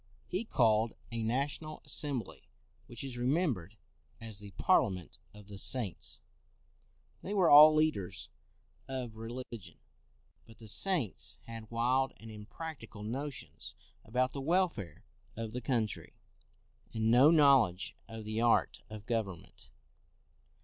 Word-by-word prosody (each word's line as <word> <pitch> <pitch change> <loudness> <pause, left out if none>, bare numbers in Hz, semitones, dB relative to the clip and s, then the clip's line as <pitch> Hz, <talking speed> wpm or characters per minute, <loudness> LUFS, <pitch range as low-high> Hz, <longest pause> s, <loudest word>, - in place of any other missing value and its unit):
He 185 +6 -2
called 115 - +3 0.2
a 115 0 -2
national 140 +7 -2
assembly 140 -6 -3 0.4
which 120 +1 -5
is 130 -3 -3
re 125 - 0
membered 125 - 0 0.4
as 110 -3 -7
the 105 -1 -9
Parliament 95 - +1
of 105 0 -14
the 100 -1 -8
Saints: 110 -5 -3 1.0
they 205 - -4
were 185 -4 +4
all 155 +1 +10
leaders 155 - 0 0.6
of 130 -4 -4
religion. 115 -1 -7 0.7
But 115 - -15
the 110 - -11
Saints 145 - 0
had 115 -1 -8
wild 125 +3 +1
and 110 0 -10
impracticable 110 +1 -8
notions 125 +2 -5 0.3
about 125 +3 0
the 140 - -5
welfare 155 - 0 0.3
of 115 -1 -5
the 125 - -3
country, 115 -3 -1 0.8
and 110 0 +2
no 130 +5 +8
knowledge 135 - +4
of 110 -1 -8
the 110 +1 -2
art 120 -1 +3
of 110 -1 -9
govern 105 -8 -1
ment. - - -16
115 Hz, 130 wpm, -33 LUFS, 110-140 Hz, 1.0 s, all